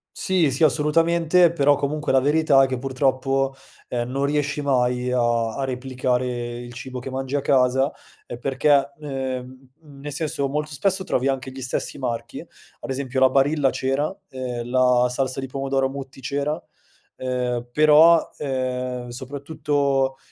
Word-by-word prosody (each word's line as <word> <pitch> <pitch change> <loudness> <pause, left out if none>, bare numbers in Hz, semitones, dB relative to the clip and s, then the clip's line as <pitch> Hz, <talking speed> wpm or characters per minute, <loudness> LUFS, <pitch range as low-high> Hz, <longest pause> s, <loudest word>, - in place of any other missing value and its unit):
Sì, 180 -6 +2
sì, 135 - 0
assolutamente, 165 +3 +3
però 145 -3 +3
comunque 150 +2 -2
la 135 - +5
verità 145 0 +4
è 135 - +3
che 130 -2 -3
purtroppo, 135 0 0 0.3
ehm, 120 0 -3
non 135 +2 -1
riesci 145 0 -1
mai 125 -2 +1
a 120 -2 +2 0.2
a 135 - -2
replicare 130 -1 -1 0.3
il 120 0 -9
cibo 130 +2 -7
che 130 - -7
mangi 135 +1 -3
a 145 - +1
casa, 130 0 +2 0.3
ehm, 120 - -8
perché, 140 +1 +2
ehm, 130 -2 -5
uhm, 145 -3 -16
nel 145 - -6
senso, 150 -1 -2
molto 150 +1 -3
spesso 190 +7 0
trovi 130 -5 0
anche 130 -1 -2
gli 130 - -9
stessi 130 +2 -2
marchi, 120 -3 -4
ad - - -13
esempio 130 -1 -2
la 130 0 +6
Barilla 140 +1 +2
c'era, 135 +6 -1 0.2
ehm, 125 -2 -5
la 125 -1 +4
salsa 130 +1 -1
di 135 - -4
pomodoro 135 0 -1
Mutti 135 0 -8
c'era, 145 +3 -2 0.6
ehm, 125 -1 -2
però, 155 +3 +6
ehm, 125 -2 -3
soprattutto 140 0 -1
135 Hz, 155 wpm, -23 LUFS, 130-145 Hz, 0.6 s, la